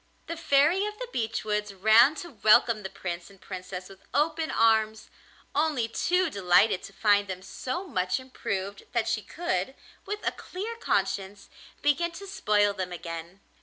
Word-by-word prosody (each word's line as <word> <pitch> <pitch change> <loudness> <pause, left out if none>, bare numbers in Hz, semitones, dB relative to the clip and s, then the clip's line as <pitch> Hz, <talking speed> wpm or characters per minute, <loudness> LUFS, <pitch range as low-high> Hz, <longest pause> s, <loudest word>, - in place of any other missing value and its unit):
The 335 - -4
Fairy 330 +5 +3
of 420 0 -7
the - - -5
Beech 225 -1 -2
Woods 210 -1 -2
ran 220 +9 +6
to 345 -2 -7
welcome 215 -1 +4
the 190 - -5
Prince 175 -1 -6
and 195 -1 -18
Princess 185 -1 -7
with 195 -1 -15
open 315 +2 +1
arms, 220 -1 +2 0.4
only 295 -6 +1
too 360 +10 +1
delighted 185 0 +3
to - - -10
find 205 0 +3
them 185 -1 -6
so 255 - -4
much 185 - -1
improved 200 -6 -5
that 235 -2 +1
she 225 -1 0
could, 265 - -2 0.3
with 420 +1 -4
a - - +3
clear 420 +6 -6
conscience, 195 - -1 0.3
begin 295 +4 +2
to 395 - -8
spoil 205 - +2
them 185 -2 -4
again. 170 +2 -7
215 Hz, 165 wpm, -28 LUFS, 195-305 Hz, 0.4 s, ran